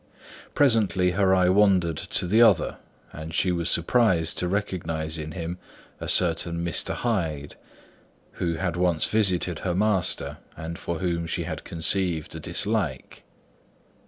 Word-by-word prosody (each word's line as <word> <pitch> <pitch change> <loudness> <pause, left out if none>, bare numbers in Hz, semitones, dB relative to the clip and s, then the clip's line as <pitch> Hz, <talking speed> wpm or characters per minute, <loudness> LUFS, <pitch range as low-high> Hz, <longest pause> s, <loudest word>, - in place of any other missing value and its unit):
Presently 110 -9 +3
her 95 +1 +2
eye 90 -1 +3
wandered 95 -5 +3
to - - 0
the 105 +6 +3
other, 105 -8 +4 0.4
and 80 +1 -7
she 90 - +2
was 85 -1 -1
surprised 85 -3 +2
to 90 - -1
recognise 85 -5 -2
in 80 0 -6
him 85 0 -5 0.4
a - - -6
certain 85 -1 +1
Mr. 85 - +1
Hyde, 80 -11 -2 0.9
who 85 -2 0
had 90 0 -2
once 90 -2 +1
visited 95 -6 +1
her 90 -2 -2
master 95 -2 0 0.2
and 80 +1 -6
for 85 - -4
whom 85 -1 -2
she - - -2
had - - -6
conceived 85 -1 0
a 80 - -7
dislike. 85 - -2
90 Hz, 140 wpm, -25 LUFS, 80-95 Hz, 0.9 s, other